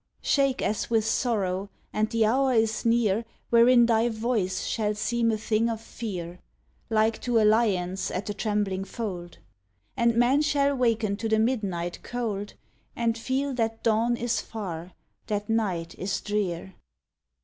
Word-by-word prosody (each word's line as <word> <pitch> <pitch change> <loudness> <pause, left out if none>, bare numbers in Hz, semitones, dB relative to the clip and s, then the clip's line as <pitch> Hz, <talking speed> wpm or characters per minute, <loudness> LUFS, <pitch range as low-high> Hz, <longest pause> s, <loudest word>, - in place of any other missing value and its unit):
Shake 275 -2 +2
as 210 0 -1
with 225 -2 +2
sorrow, 200 -5 0 0.2
and 215 0 +1
the 230 -1 +2
hour 260 +4 +2
is 220 0 +1
near 230 -2 +2 0.3
Wherein 240 +1 +6
thy 230 0 +3
voice 220 -5 -1
shall 210 -2 -1
seem 230 +2 0
a 220 - +1
thing 220 +1 +1
of 225 -1 -3
fear, 185 -6 -6 0.5
Like 220 0 +2
to 240 -2 +2
a 215 - +4
lion's 195 -4 +2
at 185 +2 -3
the 205 - -3
trembling 205 -2 -1
fold; 185 -5 -6 0.6
And 235 -1 +2
men 245 +5 +4
shall 285 -2 +2
waken 225 -5 +1
to 225 +1 -3
the 220 - +3
midnight 200 -7 -1
cold, 215 -4 -4 0.4
And 230 -1 0
feel 265 +4 -1
that 225 -2 -2
dawn 230 +2 +2
is 235 0 -1
far, 180 -5 -6 0.3
that 205 0 -2
night 190 -7 -1
is 195 +1 -1
drear. 190 -3 -2
220 Hz, 150 wpm, -26 LUFS, 200-235 Hz, 0.6 s, Wherein